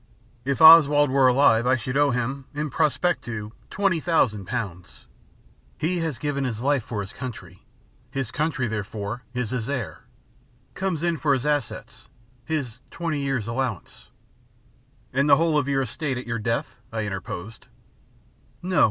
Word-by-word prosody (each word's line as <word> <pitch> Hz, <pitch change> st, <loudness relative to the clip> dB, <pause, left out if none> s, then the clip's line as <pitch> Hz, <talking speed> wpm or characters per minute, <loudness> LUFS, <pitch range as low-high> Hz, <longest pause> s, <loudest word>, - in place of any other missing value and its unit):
If 140 Hz, +4 st, +1 dB
Oswald 145 Hz, -3 st, +8 dB
were 135 Hz, -1 st, +5 dB
alive 125 Hz, -2 st, +4 dB
I 130 Hz, -, +4 dB
should 130 Hz, +1 st, -4 dB
owe 145 Hz, 0 st, +4 dB
him, 130 Hz, +2 st, -2 dB
in 150 Hz, -1 st, -3 dB
prospectu, 130 Hz, -8 st, -1 dB, 0.2 s
twenty 195 Hz, -4 st, +1 dB
thousand 125 Hz, -, +1 dB
pounds. 90 Hz, -, -6 dB, 0.7 s
He 175 Hz, +3 st, -1 dB
has 160 Hz, -6 st, -2 dB
given 145 Hz, -2 st, -2 dB
his 115 Hz, -4 st, -3 dB
life 140 Hz, 0 st, +2 dB
for 105 Hz, -1 st, -4 dB
his 100 Hz, +1 st, -7 dB
country. 95 Hz, -9 st, -8 dB, 0.5 s
His 135 Hz, -4 st, -3 dB
country, 150 Hz, -4 st, -1 dB
therefore, 105 Hz, +1 st, -4 dB
is 125 Hz, -2 st, -2 dB
his 125 Hz, -1 st, -3 dB
heir, 130 Hz, -7 st, -4 dB, 0.7 s
comes 185 Hz, -5 st, -2 dB
in 170 Hz, -1 st, +1 dB
for 145 Hz, -1 st, +2 dB
his 130 Hz, -, -4 dB
assets, 150 Hz, -1 st, -3 dB, 0.4 s
his 135 Hz, -8 st, -3 dB
twenty 165 Hz, -3 st, -3 dB
years' 135 Hz, -6 st, -1 dB
allowance 115 Hz, -5 st, -4 dB, 0.5 s
" 120 Hz, -1 st, -35 dB
"And 140 Hz, +3 st, +2 dB
the 140 Hz, -, +9 dB
whole 165 Hz, -1 st, +2 dB
of 145 Hz, -3 st, +1 dB
your 135 Hz, -1 st, +1 dB
estate 130 Hz, +2 st, -3 dB
at 125 Hz, -, -6 dB
your 115 Hz, -1 st, -3 dB
death?" 115 Hz, +2 st, -2 dB
I 110 Hz, -1 st, -2 dB
interposed. 95 Hz, +2 st, -6 dB, 1.0 s
"No. 185 Hz, 0 st, +1 dB
130 Hz, 155 wpm, -24 LUFS, 115-150 Hz, 1.0 s, the